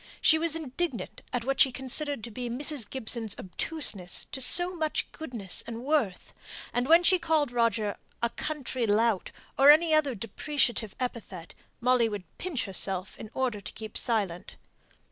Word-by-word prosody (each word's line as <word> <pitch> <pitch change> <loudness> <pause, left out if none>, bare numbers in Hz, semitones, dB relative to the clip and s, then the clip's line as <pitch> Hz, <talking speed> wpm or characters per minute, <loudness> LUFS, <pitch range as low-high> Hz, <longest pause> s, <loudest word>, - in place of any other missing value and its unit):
She 315 - +5
was 330 -1 +1
indignant 315 -2 -4
at 245 -2 -2
what 270 +1 -1
she 265 - +6
considered 265 0 -3
to 235 - -6
be 245 +2 -5
Mrs. 275 0 +1
Gibson's 225 -4 -1
obtuseness 190 - -3
to 265 - 0
so 350 +7 +5
much 315 -2 -1
goodness 235 - -1
and 230 +1 -6
worth; 270 -10 -1 0.4
and 245 +1 0
when 335 +2 +7
she 370 +1 +5
called 315 -5 +1
Roger 230 -3 +1 0.2
"a 235 0 0
country 260 -4 -3
lout," 215 -1 +2 0.3
or 275 +1 +8
any 315 +2 +6
other 295 -5 +2
depreciative 230 0 -1
epithet, 215 -9 -5 0.3
Molly 245 -1 +3
would 205 -3 -5 0.2
pinch 345 -9 -2
herself 190 -1 -2
in 215 - -8
order 250 -6 -1
to 160 - -8
keep 220 -1 -8
silent. 200 -7 -1
245 Hz, 160 wpm, -28 LUFS, 220-300 Hz, 0.4 s, or